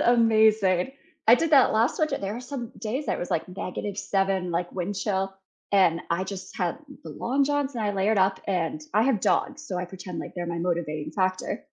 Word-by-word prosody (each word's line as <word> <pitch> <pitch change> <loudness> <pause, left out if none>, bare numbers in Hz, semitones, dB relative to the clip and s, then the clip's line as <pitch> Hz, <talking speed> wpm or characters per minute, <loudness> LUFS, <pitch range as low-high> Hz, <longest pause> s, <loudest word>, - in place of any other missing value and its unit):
amazing. 220 -3 +4 0.3
I 230 - +9
did 325 +5 0
that 275 -4 +6
last 225 +3 +2
sort 310 -1 +1
there 200 +2 -2
were 240 - -5
some 250 -2 -6
days 240 +7 -3
I - - +1
was, 175 - -5
like, 160 - -1
-7, 195 0 -2
like, 175 +1 -1
wind 185 +2 -3
chill, 195 -1 -1 0.4
and 180 -4 +4
I, 175 +3 +1
just, 195 -1 -7
had 180 +6 -1 0.2
the - - -8
long 275 +3 0
johns 285 -1 0
and 230 - -2
I 205 - 0
layered 200 +2 +2
up, 190 0 +2
and 165 -5 -1
I 215 +2 +4
have 250 -7 +2
dogs, 300 +2 0
so 185 - -3
I 180 - -2
pretend, 180 -1 -8
like, - - -6
they're 175 -1 -4
my 170 0 -3
motivating 165 -3 -2
factor. 185 -1 -1
195 Hz, 205 wpm, -26 LUFS, 180-230 Hz, 0.4 s, I